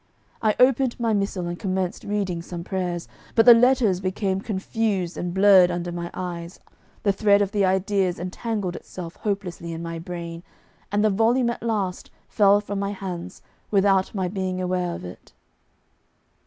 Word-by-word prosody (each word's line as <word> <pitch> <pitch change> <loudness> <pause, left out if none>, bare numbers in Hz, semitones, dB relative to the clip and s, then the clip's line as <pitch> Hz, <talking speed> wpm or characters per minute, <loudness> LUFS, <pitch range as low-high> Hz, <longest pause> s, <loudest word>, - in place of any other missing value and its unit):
I 215 -2 +2
opened 255 -1 +3
my 230 -2 +1
missal 195 -3 -1
and 175 0 -5
commenced 185 -2 -2
reading 195 -4 -2
some 170 0 -7
prayers, 180 -2 -3 0.3
but 225 - +5
the 245 - +11
letters 235 -5 +4
became 190 0 -1
confused 200 -3 -2
and 175 - -3
blurred 190 -1 +6
under 175 0 -3
my 170 0 -4
eyes, 175 -1 -6 0.4
the 200 - +3
thread 200 0 +4
of 200 -1 0
the 205 -2 +2
ideas 190 -1 +1
entangled 185 +1 -3
itself 175 -2 -8
hopelessly 190 -5 -4
in 165 +1 -6
my 165 0 -5
brain, 170 0 -6 0.5
and 205 +1 +2
the 215 - +4
volume 235 +4 +2
at - - -7
last 205 -6 -2 0.2
fell 205 -1 +4
from 205 -1 -4
my 200 0 -2
hands 185 -2 -7 0.3
without 195 -1 +2
my 190 -2 0
being 185 -1 -3
aware 180 -1 -1
of - - -8
it. 90 - -11
190 Hz, 165 wpm, -24 LUFS, 180-205 Hz, 0.5 s, the